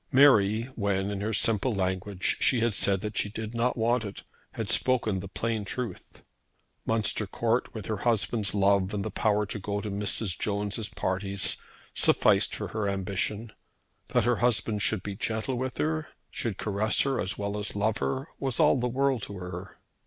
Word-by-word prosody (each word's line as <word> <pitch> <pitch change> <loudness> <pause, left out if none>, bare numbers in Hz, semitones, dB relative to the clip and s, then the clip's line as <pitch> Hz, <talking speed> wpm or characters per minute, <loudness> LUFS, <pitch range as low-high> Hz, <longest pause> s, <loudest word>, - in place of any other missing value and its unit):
Mary, 115 -6 +6
when, 100 -1 0
in 100 -1 -3
her 110 +2 -1
simple 110 +2 +2
language, 95 0 -1
she 125 - +3
had 115 -1 +2
said 100 -1 +3
that 105 0 -4
she 105 - 0
did 110 +1 -6
not 120 +2 0
want 120 +1 +2
it, 100 -2 -7 0.3
had - - -3
spoken 115 -6 +2
the 100 - -6
plain 110 +2 -2
truth. 120 +4 -6 0.6
Munster 110 -1 +1
Court, 115 +4 0
with 110 - -5
her 110 - -2
husband's 110 -1 +1
love 100 0 +3
and 100 0 -2
the 110 - -3
power 105 -1 +1
to 105 +1 -5
go 100 +1 -2
to 105 0 -4
Mrs. 100 -2 -1
Jones' 105 +1 -1
parties, 95 0 0 0.4
sufficed - - +3
for - - -4
her 110 -2 -1
ambition. 100 +3 -2 0.6
That - - +2
her 120 0 +2
husband 110 -2 +1
should 105 -1 +1
be 100 -1 -4
gentle 110 +6 -2
with 130 +1 -3
her, 155 0 -1 0.2
should 110 -5 -3
caress 105 +1 +1
her 135 -2 +1
as 95 - -3
well 100 0 -3
as 105 - -4
love 105 +1 +1
her, 135 +3 -2
was 135 0 -2
all 150 -4 +5
the 125 - 0
world 135 -1 +1
to 100 - -6
her. 90 +1 -7
105 Hz, 180 wpm, -28 LUFS, 100-115 Hz, 0.6 s, Mary